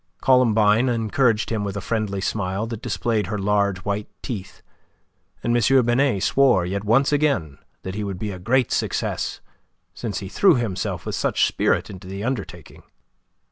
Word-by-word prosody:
Columbine 115 -2 +4
encouraged 115 -1 +1
him 110 -2 -1
with 100 0 -4
a - - -1
friendly 100 -2 -2
smile 100 +1 -2
that 115 -1 -6
displayed 115 -4 -1
her 105 +2 -3
large 100 -1 0
white 100 +1 -2
teeth, 100 -7 -7 0.8
and 120 - +1
M. 125 +2 +4
Binet 120 -4 +2
swore 130 -10 +3
yet 100 +3 -3
once 120 +7 +3
again 140 - 0 0.2
that 95 - -5
he 105 +1 -3
would 100 -2 -4
be 105 +2 -4
a 90 - -7
great 125 +6 +1
success, - - -2 0.5
since 110 -5 -4
he 95 - -5
threw 190 - +4
himself 105 -6 -3
with - - -4
such - - +1
spirit - - 0
into 95 -1 -10
the 100 +2 -6
undertaking. 105 - -5
105 Hz, 165 wpm, -23 LUFS, 100-120 Hz, 0.8 s, Columbine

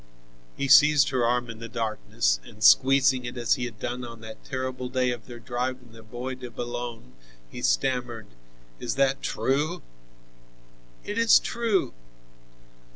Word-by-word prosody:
He 140 - -1
seized 145 +1 +6
her 130 -3 0
arm 120 +1 +1
in 115 -1 -9
the 115 0 -8
darkness, 110 - -1
and - - -11
squeezing 130 - +5
it 120 +1 -6
as 120 -3 +2
he 125 - -2
had 115 -3 -8
done 125 +3 -4
on 115 -1 -9
that 110 0 -10
terrible 130 -1 -4
day 125 -1 +1
of 120 -3 -7
their 120 -1 -9
drive 125 +3 -3
in 120 -3 -19
the 115 0 -14
Bois 120 +4 -6
de 125 -1 -8
Boulogne, 120 - -6 0.4
he - - -8
stammered: 115 - 0 0.5
"Is 120 - -3
that 135 0 +1
true?" 150 +6 -1 1.2
"It 210 +2 -3
is 230 -1 +7
true." 230 -5 -1
125 Hz, 155 wpm, -26 LUFS, 115-130 Hz, 1.2 s, is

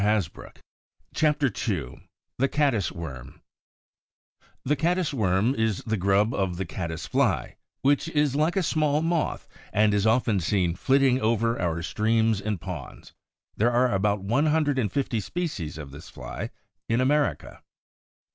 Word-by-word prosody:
CHAPTER 150 -4 +2 0.2
II 75 - -4 0.3
THE 135 - +3
CADDIS 135 -9 +1
WORM 70 -8 -8 1.3
[The 145 +3 +2
caddis 170 +2 0
worm 105 0 +2
is 110 -5 -1
the 110 - -1
grub 100 +4 +2
of 95 -5 -1
the 95 - -2
caddis 80 -1 -5
fly, - - 0 0.3
which 140 +3 +3
is 150 -4 +1
like 155 +5 +1
a 190 - +2
small 155 -1 +1
moth 165 -1 -1 0.2
and 105 0 +3
is 105 +1 +2
often 110 -3 +2
seen 90 -1 +1
flitting 135 +2 +3
over 115 0 +1
our 85 -1 -1
streams 110 +2 +1
and 105 -2 -2
ponds. 85 -6 -8 0.4
There 115 +3 +3
are 120 0 +2
about 100 0 +1
one 125 +10 +2
hundred 150 -3 +2
and 105 -6 0
fifty 130 -4 -1
species 100 - -4
of 75 -3 -8
this 75 +3 -11
fly - - -6 0.4
in 115 +1 +2
America. 145 +2 0
110 Hz, 145 wpm, -26 LUFS, 95-140 Hz, 1.3 s, THE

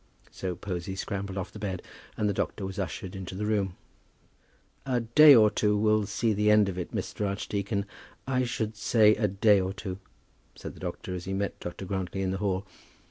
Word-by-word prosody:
So 90 -2 -4
Posy 90 0 -5
scrambled 100 0 -4
off 95 - -4
the 105 - -10
bed, 95 -3 -4 0.3
and 105 - +1
the 100 - +1
doctor 95 +1 -2
was 95 +2 -5
ushered 95 -1 -4
into 95 -1 -6
the 105 +2 -3
room. 100 -4 0 1.1
"A 125 -2 0
day 140 +6 +8
or 110 -2 +6
two 105 -1 +2
will 105 -1 +2
see 110 +1 0
the 105 +1 +2
end 105 -1 +6
of 95 -1 -3
it, 90 - -5
Mr. 105 - -3
Archdeacon; 100 0 -2 0.4
I 130 -1 +1
should 110 -3 -2
say 110 0 +4
a 110 - +1
day 100 +1 +4
or 95 +1 -2
two," 95 -2 -6 0.6
said - - -8
the - - -14
doctor, 90 - -5
as 90 -1 -5
he 95 - -3
met 100 +1 -2
Dr. 90 +2 -6
Grantly 95 0 -3
in 95 - 0
the 95 - -3
hall. 95 -1 -1
100 Hz, 200 wpm, -28 LUFS, 95-105 Hz, 1.1 s, day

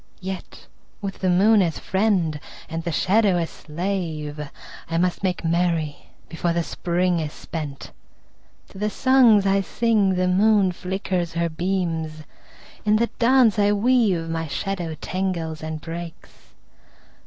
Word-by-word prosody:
Yet 190 0 -7 0.3
with 195 -2 -5
the 185 - +1
moon 200 +4 +5
as 170 -4 0
friend 190 -7 0 0.3
and 165 0 -4
the 170 - -2
shadow 195 +2 +3
as 165 -1 -2
slave 160 -3 -4 0.5
I 165 - -1
must 180 +1 0
make 180 -3 -1
merry 165 -3 0 0.2
before 170 +1 -1
the 170 0 0
Spring 175 +1 0
is 155 -2 -3
spent. 150 -5 -7 0.8
To 190 - -12
the 210 +1 0
songs 245 -4 +5
I 195 0 +3
sing 210 -2 +1
the 180 0 +1
moon 200 +1 +4
flickers 180 -1 -3
her 170 0 0
beams; 165 -3 -2 0.6
In 210 0 +3
the 235 +2 +1
dance 235 -3 +4
I 205 0 +4
weave 210 -6 +2
my 165 0 -3
shadow 170 +1 -3
tangles 175 -4 -3
and 155 0 -4
breaks. 165 +1 -8
180 Hz, 140 wpm, -23 LUFS, 165-200 Hz, 0.8 s, moon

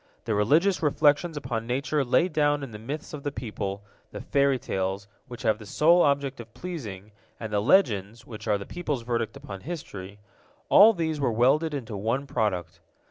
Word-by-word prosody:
The 110 - 0
religious 155 - +3
reflections 150 +2 +2
upon 120 -5 -4
nature 140 +4 0
laid 160 +7 +2
down 145 -1 +2
in 135 - -7
the 105 - -8
myths 145 +9 -6
of 150 - -6
the 145 - -3
people, 105 -5 -5 0.3
the - - -8
fairy 140 -1 +2
tales, 95 -3 -3 0.2
which 125 +1 -9
have 110 -2 +2
the 105 - -10
sole 170 - +4
object 140 -2 +1
of 115 -1 -10
pleasing, 110 - -7 0.3
and 110 -2 -6
the 105 - +2
legends, 110 - +2
which 110 -1 -9
are 105 -1 +2
the 100 - -8
people's 150 -8 -4
verdict 115 -2 -2
upon 95 -2 -9
history—all 105 - +1
these 160 -5 -2
were 135 -4 +1
welded 140 +7 +2
into 115 -6 -5
one 115 +7 -1
product. 95 -9 -2
125 Hz, 180 wpm, -26 LUFS, 105-145 Hz, 0.3 s, sole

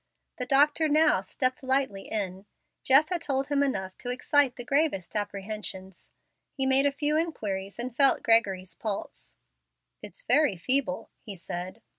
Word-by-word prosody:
The 250 - -4
doctor 295 +3 +3
now 305 -8 +4
stepped 255 +6 -2
lightly 260 -7 -1
in. 195 -2 -4 0.3
Jeff 280 +4 +5
had 355 -2 -2
told 275 -2 -1
him 285 -1 +1
enough 190 -9 -2
to 245 - -5
excite 260 +1 +2
the 245 - -8
gravest 280 - 0
apprehensions. 200 -2 -5 0.4
He 270 - -1
made 265 +1 +3
a - - +1
few 295 +2 -1
inquiries 205 - -3
and 240 0 -5
felt 275 0 +4
Gregory's 195 -6 +2
pulse. 205 +2 -5 0.7
"It's - - -4
very 295 - +3
feeble," 225 0 -1
he 205 - -9
said. 180 +5 -7
250 Hz, 150 wpm, -27 LUFS, 195-280 Hz, 0.7 s, Jeff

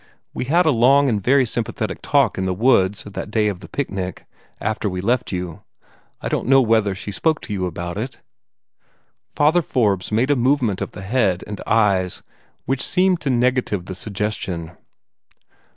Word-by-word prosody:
We - - -3
had 170 +7 +3
a 155 - +4
long 135 +3 +4
and 105 -4 0
very 130 +5 +4
sympathetic 110 -2 -3
talk 140 -9 +2
in 95 - -1
the 95 -1 -1
woods, 105 -3 +3
that 105 0 -6
day 105 0 +1
of 95 -4 -5
the - - -12
picnic, 95 -10 -4 0.3
after 110 0 -1
we 90 -1 -4
left 120 +6 0
you. 90 -3 -4 0.6
I - - -3
don't - - -2
know 135 +1 +6
whether 110 -5 +2
she 100 +1 -6
spoke 155 - +1
to 105 - -6
you 95 -2 -1
about 85 +2 -5
it?" 130 +4 -5 1.2
Father 155 +4 +4
Forbes 105 - 0
made 120 +6 +2
a - - +4
movement 125 -5 +1
of - - -4
the 95 - -8
head 100 -4 +1
and 105 -1 -7
eyes 100 -5 +1 0.4
which 135 +1 -1
seemed 185 -1 +2
to 140 - -2
negative 125 -6 +1
the 95 - -6
suggestion. 95 -4 -4
110 Hz, 175 wpm, -21 LUFS, 95-130 Hz, 1.2 s, know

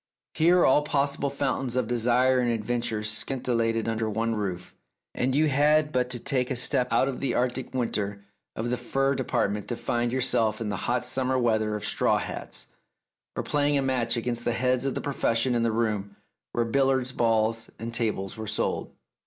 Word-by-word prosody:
Here 175 +2 +4
all 135 +2 +5
pos 140 -1 0
sible 140 -1 -2
fountains 135 -3 -1
of 130 -3 +1
desire 125 +2 +3
and 125 -1 +1
adventure 115 -1 -2
scintillated 115 0 -1
under 110 -1 -1
one 115 +2 -1
roof, 95 -4 -4 0.4
and 130 +1 0
you 155 +2 +4
had 150 +2 +3
but 125 -2 0
to 125 - -4
take 125 +1 -1
a 130 - -1
step 125 +1 +1
out 130 - +3
of 135 - -3
the 130 -3 -1
Arctic 125 +1 -1
winter 105 -5 -2 0.3
of 120 +2 -3
the 125 - 0
fur 135 +3 0
department 105 -6 -1
to 120 - -2
find 120 0 -1
yourself 115 -4 +1
in 110 -2 -3
the 100 - -2
hot 125 0 +1
summer 130 +1 0
weather 110 -3 +1
of 105 - -5
straw - - +2
hats, - - -6 0.7
or - - -2
playing 145 0 +1
a 135 - +1
match 125 -3 0
against 120 0 -2
the 120 - 0
heads 125 +2 +1
of 135 - -2
the - - -2
profes 140 -4 0
sion 125 +2 +2
in 120 - +1
the 115 0 +1
room 105 -3 -1 0.4
where 120 - 0
billiard 130 +1 +1
balls 115 -1 +1
and 115 +1 -6
tables 110 -5 -2
were 110 -1 -6
sold. - - -2
120 Hz, 195 wpm, -26 LUFS, 115-130 Hz, 0.7 s, all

